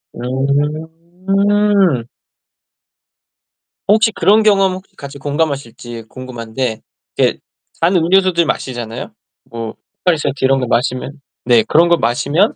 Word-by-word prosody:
음. 165 Hz, -, 0 dB, 1.8 s
혹시 220 Hz, +2 st, +4 dB
그런 210 Hz, +4 st, +3 dB
경험 195 Hz, -3 st, +4 dB
혹시 185 Hz, +1 st, -10 dB
같이 140 Hz, 0 st, -9 dB
공감하실지 140 Hz, -6 st, -3 dB
궁금한데 120 Hz, -2 st, -5 dB, 0.4 s
이게 -, -, +2 dB, 0.4 s
단 175 Hz, +3 st, +3 dB
음료수들 175 Hz, 0 st, +3 dB
마시잖아요. 120 Hz, -, -4 dB, 0.4 s
뭐 115 Hz, -1 st, -6 dB, 0.3 s
포카리스웨트 145 Hz, -6 st, 0 dB
이런 135 Hz, 0 st, +3 dB
것 125 Hz, -, -2 dB
마시면 130 Hz, +4 st, -1 dB, 0.2 s
네 120 Hz, -2 st, +5 dB
그런 170 Hz, +3 st, +4 dB
거 170 Hz, -, +4 dB
마시면 145 Hz, -, +1 dB
145 Hz, 250 characters per minute, -16 LUFS, 125-185 Hz, 1.8 s, 네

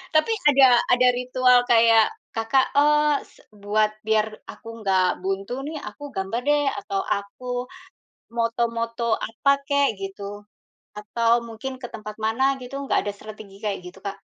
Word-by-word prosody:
Tapi, 310 Hz, +9 st, +3 dB, 0.2 s
ada 270 Hz, -2 st, +7 dB, 0.2 s
ada 250 Hz, 0 st, +5 dB
ritual 250 Hz, 0 st, +4 dB
kayak, 225 Hz, -1 st, +5 dB, 0.3 s
Kakak, 225 Hz, +4 st, +2 dB
oh, 300 Hz, 0 st, +4 dB
se -, -, -22 dB
buat 210 Hz, +1 st, +1 dB, 0.2 s
biar 220 Hz, 0 st, +2 dB, 0.2 s
aku 230 Hz, -, -12 dB, 0.2 s
nggak 190 Hz, -1 st, +3 dB, 0.2 s
buntu 195 Hz, +4 st, -2 dB
nih, 310 Hz, +1 st, -5 dB
aku 290 Hz, -, -14 dB
gambar 195 Hz, +5 st, -2 dB
deh, 295 Hz, 0 st, +3 dB
atau 200 Hz, -1 st, -3 dB
aku 200 Hz, +5 st, -4 dB, 0.9 s
moto-moto 230 Hz, 0 st, -1 dB, 0.2 s
apa 230 Hz, +5 st, 0 dB, 0.2 s
kek, 280 Hz, 0 st, +3 dB
gitu. 195 Hz, +1 st, -7 dB, 0.8 s
Atau 230 Hz, +2 st, 0 dB, 0.2 s
mungkin 230 Hz, +4 st, -6 dB
ke 245 Hz, -, -5 dB
tempat 215 Hz, -1 st, -7 dB
mana, 225 Hz, +4 st, 0 dB, 0.2 s
gitu. 250 Hz, +2 st, -8 dB
Nggak -, -, +2 dB
ada 205 Hz, -, -1 dB
strategi 215 Hz, -2 st, -11 dB
kayak 200 Hz, -3 st, -2 dB
gitu, 180 Hz, +2 st, -11 dB
Kak? 200 Hz, 0 st, -4 dB
230 Hz, 145 wpm, -24 LUFS, 205-255 Hz, 0.9 s, ada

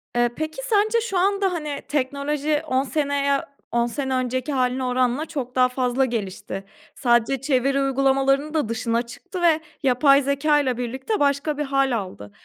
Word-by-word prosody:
Iıı, 240 Hz, 0 st, +3 dB
peki 315 Hz, +9 st, -4 dB
sence 435 Hz, +1 st, +2 dB
şu 440 Hz, -5 st, -2 dB
anda 390 Hz, +1 st, +2 dB
hani 300 Hz, -4 st, -4 dB
teknoloji 290 Hz, +2 st, -1 dB
10 260 Hz, -1 st, +1 dB
seneye, 280 Hz, -1 st, 0 dB, 0.3 s
10 235 Hz, 0 st, +2 dB
sene 265 Hz, +2 st, -3 dB
önceki 255 Hz, +3 st, -1 dB
hâline 255 Hz, 0 st, 0 dB
oranla 250 Hz, +3 st, +1 dB
çok 270 Hz, -6 st, -5 dB
daha 255 Hz, 0 st, +4 dB
fazla 250 Hz, +1 st, +1 dB
gelişti. 195 Hz, -5 st, -4 dB, 0.3 s
Sadece 240 Hz, +1 st, +2 dB
çeviri 275 Hz, 0 st, +1 dB
uygulamalarının 275 Hz, +2 st, +2 dB
da 300 Hz, -8 st, 0 dB
dışına 230 Hz, 0 st, 0 dB
çıktı 360 Hz, +10 st, -8 dB
ve 330 Hz, -2 st, +4 dB, 0.2 s
yapay 275 Hz, +2 st, +5 dB
zekâyla 280 Hz, -2 st, +1 dB
birlikte 260 Hz, -, -3 dB
başka 285 Hz, +1 st, +1 dB
bir 295 Hz, -, -1 dB
hâl 275 Hz, -1 st, +1 dB
aldı. 185 Hz, -, -7 dB
275 Hz, 155 wpm, -23 LUFS, 250-300 Hz, 0.3 s, yapay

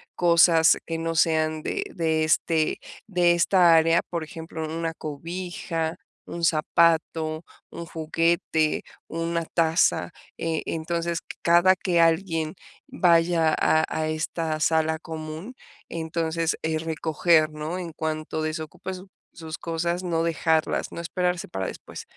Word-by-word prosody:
cosas 170 Hz, -1 st, +5 dB
que 165 Hz, -, -3 dB
no 165 Hz, 0 st, -2 dB
sean 155 Hz, -1 st, +2 dB
de -, -, -2 dB
de, 160 Hz, -3 st, +1 dB
este, 155 Hz, 0 st, +1 dB, 0.3 s
de 180 Hz, -4 st, +3 dB
esta 175 Hz, 0 st, +5 dB
área, 165 Hz, +1 st, +4 dB
por 170 Hz, -2 st, -3 dB
ejemplo, 160 Hz, +1 st, -7 dB
una 165 Hz, +1 st, -3 dB
cobija, 165 Hz, +1 st, -4 dB, 0.3 s
un 170 Hz, -, -6 dB
zapato, 160 Hz, 0 st, +1 dB, 0.3 s
un 170 Hz, -, -7 dB
juguete, 160 Hz, -1 st, 0 dB, 0.2 s
una 165 Hz, +1 st, -2 dB
taza, 165 Hz, +1 st, +1 dB, 0.3 s
eh, 165 Hz, -1 st, -2 dB
entonces 170 Hz, +1 st, -2 dB, 0.2 s
cada 175 Hz, +2 st, +5 dB
que 180 Hz, -2 st, 0 dB
alguien 165 Hz, -1 st, +2 dB, 0.3 s
vaya 170 Hz, -2 st, +3 dB
a 155 Hz, 0 st, +3 dB
a 155 Hz, 0 st, -2 dB
esta 155 Hz, 0 st, -2 dB
sala 160 Hz, 0 st, +1 dB
común, 160 Hz, +8 st, -7 dB, 0.3 s
entonces, 165 Hz, 0 st, -1 dB
eh, 160 Hz, 0 st, -1 dB
recoger, 160 Hz, 0 st, +2 dB
¿no?, 155 Hz, +3 st, -5 dB
en 175 Hz, -2 st, -6 dB
cuanto 155 Hz, 0 st, -3 dB
desocupe 160 Hz, +4 st, -5 dB
su 185 Hz, +1 st, -10 dB, 0.3 s
sus 160 Hz, -1 st, -7 dB
cosas, 170 Hz, +2 st, -2 dB
no 165 Hz, -2 st, 0 dB
dejarlas, 160 Hz, -1 st, 0 dB
no -, -, -7 dB
esperarse 180 Hz, +1 st, -2 dB
para 95 Hz, 0 st, -4 dB
después, -, -, -8 dB
165 Hz, 125 wpm, -25 LUFS, 160-170 Hz, 0.3 s, cosas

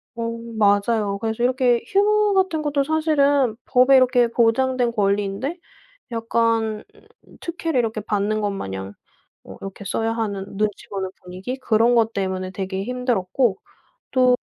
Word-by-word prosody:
어 230 Hz, -, -4 dB, 0.3 s
맞아요. 205 Hz, 0 st, +2 dB
그래서 225 Hz, +2 st, -2 dB
이렇게 250 Hz, -1 st, +2 dB
휴무 420 Hz, +1 st, +3 dB
같은 375 Hz, -5 st, +1 dB
것도 290 Hz, -2 st, 0 dB
사실은 285 Hz, -5 st, +2 dB
법에 255 Hz, +1 st, +5 dB
이렇게 250 Hz, -2 st, +4 dB
보장된 240 Hz, +1 st, +2 dB
권리인데 205 Hz, -, -1 dB, 0.5 s
약간 225 Hz, -1 st, 0 dB, 0.6 s
특혜를 330 Hz, -4 st, -2 dB
이렇게 220 Hz, -2 st, -2 dB
받는 210 Hz, +1 st, -1 dB
것 205 Hz, -1 st, 0 dB
마냥 95 Hz, -, -5 dB, 0.5 s
어 -, -, -11 dB
이렇게 195 Hz, 0 st, -8 dB
써야 225 Hz, +3 st, -1 dB
하는 205 Hz, -4 st, -3 dB
눈치 210 Hz, -1 st, -2 dB
보는 195 Hz, -1 st, -3 dB
분위기 185 Hz, +8 st, -6 dB
그런 235 Hz, -1 st, +2 dB
것 225 Hz, -1 st, +3 dB
때문에 190 Hz, -1 st, -2 dB
되게 190 Hz, 0 st, -4 dB
힘들었고 245 Hz, -3 st, 0 dB, 0.5 s
또 255 Hz, -1 st, +4 dB
230 Hz, 300 characters per minute, -22 LUFS, 200-260 Hz, 0.6 s, 법에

